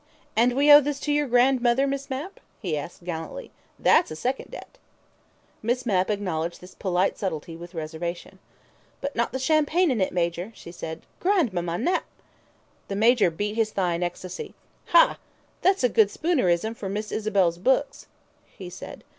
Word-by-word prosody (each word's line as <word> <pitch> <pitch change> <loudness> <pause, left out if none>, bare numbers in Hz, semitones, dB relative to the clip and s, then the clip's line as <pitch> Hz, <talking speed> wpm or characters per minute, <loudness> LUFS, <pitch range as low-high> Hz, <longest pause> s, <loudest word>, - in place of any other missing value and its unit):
"And 240 +3 +4
we 290 +2 +5
owe 290 0 +11
this 285 0 -3
to 295 - -1
your 295 0 +1
grandmother, 250 +1 +3
Miss 275 0 -3
Mapp?" 285 +9 -5 0.2
he 175 -8 -2
asked 160 +4 -7
gallantly. 165 -2 -6 0.3
"That's - - +4
a 155 - -6
second 255 +11 -3
debt." - - -11 0.8
Miss 245 +3 -1
Mapp 190 -4 +1
acknowledged 175 -5 -2
this 180 +1 -13
polite 185 0 0
subtlety 165 -3 -4
with 175 +2 -11
a - - -7
reservation. 165 +2 -5 0.6
"But 280 +1 -4
not 235 0 0
the 260 - -2
champagne 310 +4 +2
in 230 -6 0
it, 185 - +1
Major," 175 +3 -2
she 170 - -11
said. 160 -1 -7 0.2
"Grandmamma 210 - +1
Nap 350 - 0 0.5
" - - -37
The 195 - -4
Major 225 -1 +4
beat 205 +6 -3
his 225 -1 +1
thigh 185 -4 0
in 170 - -3
ecstasy. 180 +1 -5 0.3
"Ha! - - +5 0.4
That's 380 -2 +3
a - - +6
good 220 -3 +4
Spoonerism 220 - +1
for 195 -3 -5
Miss 210 +2 -4
Isabel's 195 -6 +1
book," 265 +8 +3 0.6
he 180 -2 -10
said. 185 - -9
210 Hz, 170 wpm, -25 LUFS, 175-265 Hz, 0.8 s, owe